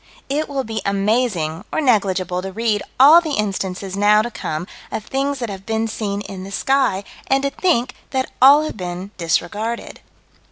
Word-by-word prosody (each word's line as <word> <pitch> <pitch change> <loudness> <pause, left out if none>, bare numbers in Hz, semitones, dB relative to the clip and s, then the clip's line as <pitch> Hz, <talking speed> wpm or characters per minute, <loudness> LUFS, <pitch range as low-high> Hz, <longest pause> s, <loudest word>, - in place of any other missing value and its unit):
It 295 +3 -1
will 275 -2 -2
be 220 -2 -4
amazing 200 -5 0
or - - 0
negligible 190 - +1
to 190 +1 -6
read 215 0 0 0.2
all 300 +6 +9
the 310 -4 -2
instances 195 -2 -3
now 210 +1 +4
to 240 - -4
come 155 -5 -4 0.3
of 215 - -4
things 275 +2 -1
that 235 -4 -4
have 190 -1 -8
been 225 +1 -1
seen 205 -2 -3
in 195 -2 -7
the 195 - -8
sky, 260 -3 +1 0.2
and 270 0 +2
to 280 - 0
think 255 -10 +1 0.2
that 260 -1 -2
all 280 +3 +8
have 310 - -5
been 180 +1 -5
disregarded. 210 +7 -2
215 Hz, 175 wpm, -20 LUFS, 195-265 Hz, 0.3 s, all